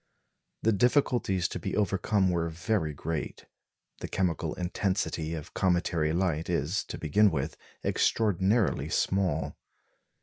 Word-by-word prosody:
The 115 Hz, -, +4 dB
difficulties 115 Hz, -4 st, +2 dB
to -, -, -4 dB
be -, -, -3 dB
overcome 100 Hz, -1 st, +2 dB
were 85 Hz, -1 st, 0 dB
very 85 Hz, 0 st, -1 dB
great. 75 Hz, +2 st, -4 dB, 0.5 s
The -, -, -5 dB
chemical 90 Hz, -4 st, -1 dB
intensity 90 Hz, -3 st, -1 dB
of 75 Hz, -2 st, -8 dB
cometary 85 Hz, -4 st, +1 dB
light 85 Hz, -2 st, 0 dB
is, 85 Hz, +5 st, 0 dB
to -, -, -6 dB
begin 100 Hz, +7 st, +4 dB
with, 75 Hz, -2 st, -2 dB, 0.3 s
extraordinarily 105 Hz, 0 st, +2 dB
small. 95 Hz, -5 st, 0 dB
90 Hz, 115 wpm, -29 LUFS, 80-100 Hz, 0.5 s, The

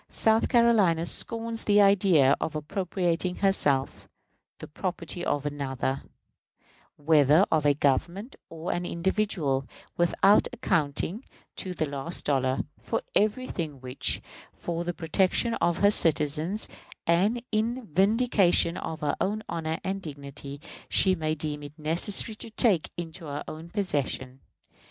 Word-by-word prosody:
South 220 Hz, 0 st, +2 dB
Carolina 210 Hz, -9 st, +3 dB
scorns 230 Hz, +4 st, -1 dB
the 205 Hz, 0 st, +4 dB
idea 190 Hz, -9 st, +5 dB
of 155 Hz, -, -3 dB
appropriating 180 Hz, +2 st, -2 dB
to -, -, -13 dB
herself 145 Hz, -9 st, +1 dB, 0.5 s
the -, -, -9 dB
property 175 Hz, +1 st, -5 dB
of 145 Hz, -3 st, -1 dB
another, 135 Hz, -2 st, -3 dB, 0.9 s
whether 150 Hz, +3 st, +4 dB
of 155 Hz, -2 st, +2 dB
a 145 Hz, -, +4 dB
government 170 Hz, -, -1 dB
or 165 Hz, +1 st, -5 dB
an 175 Hz, -, -2 dB
individual, 175 Hz, -6 st, -1 dB, 0.3 s
without 175 Hz, +4 st, +4 dB
accounting, 185 Hz, -, -1 dB, 0.3 s
to 185 Hz, -1 st, -4 dB
the 160 Hz, -, 0 dB
last 140 Hz, +4 st, -3 dB
dollar, 130 Hz, -2 st, +1 dB, 0.2 s
for 230 Hz, -, -2 dB
everything 205 Hz, -, -1 dB
which, 125 Hz, +1 st, -3 dB, 0.3 s
for 170 Hz, 0 st, -4 dB
the 175 Hz, -, -2 dB
protection 190 Hz, +7 st, +1 dB
of 170 Hz, 0 st, +2 dB
her 205 Hz, 0 st, +4 dB
citizens 160 Hz, +3 st, 0 dB, 0.4 s
and 200 Hz, +8 st, +2 dB
in 230 Hz, +3 st, -1 dB
vindication 195 Hz, -1 st, +2 dB
of 160 Hz, -, -6 dB
her 145 Hz, -1 st, 0 dB
own 215 Hz, +3 st, -1 dB
honor 160 Hz, -1 st, -3 dB
and 195 Hz, +1 st, -3 dB
dignity, 140 Hz, -2 st, -9 dB, 0.3 s
she 190 Hz, -, +5 dB
may 155 Hz, -3 st, -1 dB
deem 150 Hz, -1 st, -4 dB
it 145 Hz, +2 st, -11 dB
necessary 170 Hz, +8 st, +4 dB
to 215 Hz, -, -8 dB
take 210 Hz, -6 st, +2 dB
into 170 Hz, 0 st, -7 dB
her 145 Hz, -1 st, -5 dB
own 160 Hz, +2 st, -8 dB
possession. 140 Hz, -9 st, -2 dB
170 Hz, 130 wpm, -27 LUFS, 150-200 Hz, 0.9 s, idea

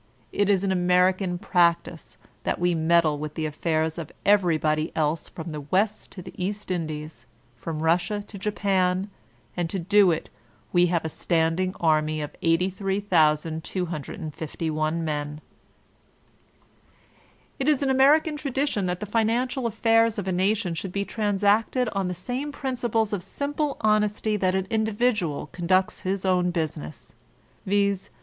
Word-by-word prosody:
It 205 Hz, 0 st, +1 dB
is 195 Hz, -2 st, +3 dB
American 180 Hz, 0 st, +2 dB
practice 170 Hz, -3 st, 0 dB, 0.2 s
that -, -, -1 dB
we 175 Hz, 0 st, +1 dB
meddle 160 Hz, -2 st, +3 dB
with 150 Hz, 0 st, -5 dB
the 160 Hz, -, -2 dB
affairs 160 Hz, +1 st, -1 dB
of 160 Hz, -2 st, -7 dB
everybody 160 Hz, -6 st, +2 dB
else 155 Hz, 0 st, 0 dB
from 160 Hz, 0 st, -7 dB
the 150 Hz, -1 st, -5 dB
West 195 Hz, +9 st, 0 dB
to 185 Hz, -, -9 dB
the -, -, -10 dB
East 205 Hz, +1 st, -3 dB
Indies, 155 Hz, -3 st, -5 dB, 0.3 s
from 155 Hz, +6 st, -5 dB
Russia 175 Hz, +5 st, +1 dB
to 205 Hz, 0 st, -10 dB
Japan; 195 Hz, -1 st, 0 dB, 0.4 s
and 175 Hz, -2 st, -1 dB
to 195 Hz, -, -3 dB
do 195 Hz, +2 st, +4 dB
it 165 Hz, -2 st, -2 dB, 0.4 s
we 175 Hz, 0 st, +5 dB
have 170 Hz, -2 st, 0 dB
a -, -, -1 dB
standing 170 Hz, +3 st, 0 dB
anny 155 Hz, -1 st, +2 dB
of 150 Hz, -1 st, -5 dB
83,251 165 Hz, -3 st, -1 dB
men. 150 Hz, -1 st, -3 dB, 2.2 s
It 270 Hz, -, -1 dB
is 290 Hz, -2 st, +2 dB
American 280 Hz, +3 st, +4 dB
tradition 275 Hz, -8 st, -1 dB
that 180 Hz, 0 st, -3 dB
the -, -, -2 dB
financial 235 Hz, +4 st, 0 dB
affairs 225 Hz, 0 st, +2 dB
of 200 Hz, -2 st, -3 dB
a -, -, 0 dB
nation 190 Hz, 0 st, +1 dB
should 180 Hz, +3 st, -4 dB
be 200 Hz, +1 st, -2 dB
transacted 210 Hz, +4 st, +1 dB
on 195 Hz, -3 st, -2 dB
the 180 Hz, -, -3 dB
same 250 Hz, -, -4 dB
principles 240 Hz, -6 st, -1 dB
of 200 Hz, -, -1 dB
8inq>le 290 Hz, -, -3 dB
honesty 215 Hz, 0 st, +1 dB
that 185 Hz, -2 st, +1 dB
an 190 Hz, -1 st, 0 dB
individual 215 Hz, -, 0 dB
conducts 185 Hz, +2 st, +1 dB
his 190 Hz, +1 st, -2 dB
own 180 Hz, -1 st, +2 dB
busi 160 Hz, -3 st, -2 dB
ness; 75 Hz, +1 st, -10 dB, 0.5 s
viz. 200 Hz, -1 st, +1 dB
185 Hz, 140 wpm, -25 LUFS, 165-210 Hz, 2.2 s, we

